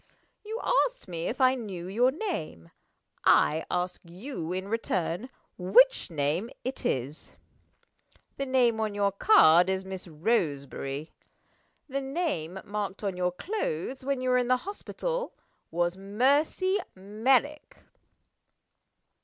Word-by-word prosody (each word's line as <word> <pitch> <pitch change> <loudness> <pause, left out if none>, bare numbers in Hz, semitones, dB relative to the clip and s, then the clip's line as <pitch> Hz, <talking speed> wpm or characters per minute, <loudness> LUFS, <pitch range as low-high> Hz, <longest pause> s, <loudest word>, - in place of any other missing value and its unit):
You 440 +2 -5 0.3
asked - - -15
me 170 -2 -4
if 250 - -3
I 260 -1 +5
knew 195 -9 -6
your 235 +7 +3
name. 265 - -5 0.5
I 160 +2 +4
ask 180 +1 -2
you, 175 - -6
in 185 +1 -3
return, 200 -1 -2 0.3
which 220 +10 +5
name 160 +7 -1
it 260 +2 -4
is? 135 +4 -3 1.0
The 275 - -2
name 245 -4 +3
on 215 -2 -1
your 200 -1 +2
card 180 - +6
is 190 0 -1
'Miss 190 -1 -7
Roseberry.' 150 - -2 0.8
The 275 -1 -2
name 265 - -2
marked 205 -1 -4
on 195 -2 -1
your 180 0 0
clothes, 260 - -3
when 275 -1 -1
you 255 0 +1
were 250 - +4
in 245 - 0
the 255 0 +4
hospital, - - -4 0.4
was 175 +2 0
'Mercy 280 - +2 0.2
Merrick. 245 +10 0
205 Hz, 125 wpm, -28 LUFS, 175-265 Hz, 1.0 s, card